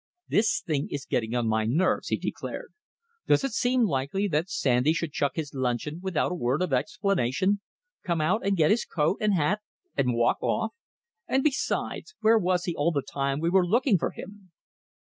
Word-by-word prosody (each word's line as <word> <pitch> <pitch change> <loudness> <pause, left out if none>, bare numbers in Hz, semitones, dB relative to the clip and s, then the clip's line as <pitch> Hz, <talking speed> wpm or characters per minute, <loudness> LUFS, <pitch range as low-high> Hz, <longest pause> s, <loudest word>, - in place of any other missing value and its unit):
"This 220 +1 +2
thing 150 -6 -1
is 140 -1 -5
getting 115 0 -1
on 120 -2 0
my 110 0 +1
nerves," 155 +12 +1
he - - 0
declared. - - -5 0.5
"Does - - +4
it 275 - -1
seem 245 +2 +2
likely 170 +3 0
that 160 +3 0
Sandy 130 +1 +2
should 170 -2 -2
chuck 140 -1 0
his 155 -3 -4
luncheon 130 +4 -2
without 185 -5 0
a 180 - -4
word 130 +8 +1
of 170 -7 -2
explanation, 190 - +1 0.4
come 170 -4 -1
out 180 +9 +1
and 195 -1 +1
get 155 -2 +4
his 230 - +2
coat 160 +4 0
and 210 -2 +2
hat 185 +6 +1 0.3
and 125 -3 +1
walk 120 0 +2
off? 220 - -1 0.5
And, 265 0 +1
besides, 305 +8 -1
where 225 +1 +5
was 180 -2 +1
he 175 - -2
all 150 +4 +1
the 140 -4 -1
time 140 0 -2
we 165 +2 0
were 190 0 +5
looking 220 +2 +3
for - - 0
him?" 200 -1 -11
170 Hz, 190 wpm, -27 LUFS, 140-200 Hz, 0.5 s, where